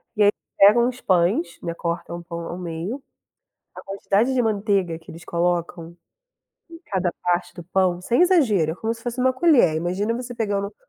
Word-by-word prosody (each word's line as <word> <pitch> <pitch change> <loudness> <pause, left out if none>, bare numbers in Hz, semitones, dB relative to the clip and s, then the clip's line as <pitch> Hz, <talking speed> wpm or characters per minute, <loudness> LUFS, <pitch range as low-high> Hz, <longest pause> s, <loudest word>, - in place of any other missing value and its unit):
E 210 - +3
aí 205 - +7 0.3
pegam 235 +5 +6
os 250 0 -5
pães, 175 -1 +1
né, 170 - -4
cortam 170 0 -4
o - - -12
pão 170 -1 -6
ao 175 - -6
meio. 180 +9 -5 0.7
A - - -10
quantidade 200 +5 0
de 255 - +2
manteiga 200 -6 0
que 165 - -18
eles 165 +1 -11
colocam 170 -1 -2 0.8
em 330 - -11
cada 185 -3 -1
parte 175 0 -1
do 175 - -9
pão, 185 -1 +1
sem 240 - +1
exagero, 235 - +3
é - - -6
como 220 +4 -2
se 230 - -15
fosse 240 0 -4
uma 260 0 +4
colher, 260 - +4
imagina 180 +7 -1
você 245 0 -6
pegando 205 -4 -1
uma 205 - -13
190 Hz, 195 wpm, -23 LUFS, 170-230 Hz, 0.8 s, aí